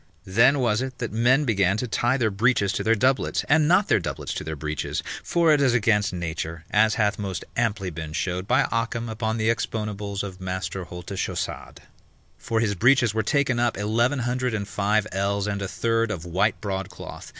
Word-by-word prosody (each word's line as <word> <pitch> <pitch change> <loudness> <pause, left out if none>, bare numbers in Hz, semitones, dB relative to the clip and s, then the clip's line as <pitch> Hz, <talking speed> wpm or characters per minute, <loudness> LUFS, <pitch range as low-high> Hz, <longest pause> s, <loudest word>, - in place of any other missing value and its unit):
Then 120 +9 +4
was 120 -4 +1
it 130 -1 -5
that 115 - -4
men 125 +6 +3
began 100 -4 +2
to 125 - -2
tie 120 +3 +1
their 115 -5 +1
breeches 100 -1 +2
to - - -2
their 115 +1 +3
doublets, 130 +5 +1
and 155 0 +4
not 185 +5 +4
their - - +3
doublets 85 - -4
to - - -4
their 80 0 -4
breeches: 75 0 -3 0.2
for 170 -2 +3
it 145 - +3
is 130 -3 +3
against 105 -3 +2
nature, 80 -2 -5
as 110 0 +4
hath 105 -1 +1
most 95 -3 -4
amply 105 -6 -1
been 80 -1 -6
showed 90 +3 -2
by 125 +3 +4
Ockham 115 0 -1
upon 110 0 -2
the 110 +1 +2
exponibles 105 -3 -3
of 95 -2 -7
Master 95 0 -4
Haultechaussade. 90 +2 -5 0.6
For 115 - -1
his 105 -3 +1
breeches 120 +2 +3
were 110 - +1
taken 135 +1 +1
up 120 -3 +1
eleven 115 +7 +1
hundred 125 -1 -1
and 100 -2 -3
five 105 +1 +1
ells 100 +1 0
and 100 -1 -2
a 95 - -2
third 115 +3 0
of 90 -6 -4
white 95 +4 +1
broadcloth. 95 -2 -6
110 Hz, 195 wpm, -24 LUFS, 95-120 Hz, 0.6 s, Then